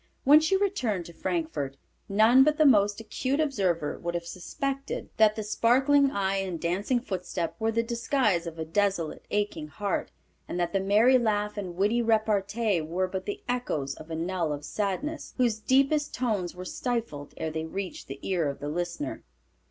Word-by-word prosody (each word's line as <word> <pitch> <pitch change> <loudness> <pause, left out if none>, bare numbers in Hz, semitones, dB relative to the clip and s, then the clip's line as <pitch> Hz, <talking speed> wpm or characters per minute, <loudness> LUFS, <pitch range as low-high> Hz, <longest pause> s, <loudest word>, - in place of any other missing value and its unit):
When 295 +3 +8
she 315 +5 +2
returned 250 - -1
to 170 - -11
Frankfort 160 -7 -3 0.3
none 220 +6 +6
but 300 +1 +2
the 310 - +5
most 205 -6 +4
acute 255 +5 -2
observer 190 - 0
would 170 0 -3
have 170 0 -3
suspected 275 - -4
that 215 -1 +5
the 215 - -3
sparkling 270 +6 +3
eye 195 -4 0
and 185 -4 -3
dancing 195 +9 0
footstep 180 -6 -4
were 225 0 +1
the 230 +1 +1
disguise 230 -6 0
of 165 -1 -7
a 160 - -3
desolate, 190 -1 -1
aching 205 -7 -1
heart 200 +4 -2 0.4
and 180 - -4
that 175 -1 -1
the 195 - +2
merry 215 +7 +5
laugh 210 -2 0
and 190 -4 -5
witty 210 +6 +2
repartee 215 -3 +1
were 175 +4 -1
but 190 0 -5
the 205 - -4
echoes 200 - -2
of 155 +3 -12
a 160 - -3
knell 170 -1 -1
of 145 0 -4
sadness, 235 - -3
whose 235 -4 +2
deepest 275 +6 +2
tones 210 -9 -1
were 180 0 -7
stifled 220 - -3
ere 160 - -3
they 160 0 -3
reached 190 +3 -5
the 135 - -6
ear 175 -6 +1
of 140 - -5
the 145 - -4
listener. 170 -3 -4
200 Hz, 180 wpm, -28 LUFS, 170-240 Hz, 0.4 s, When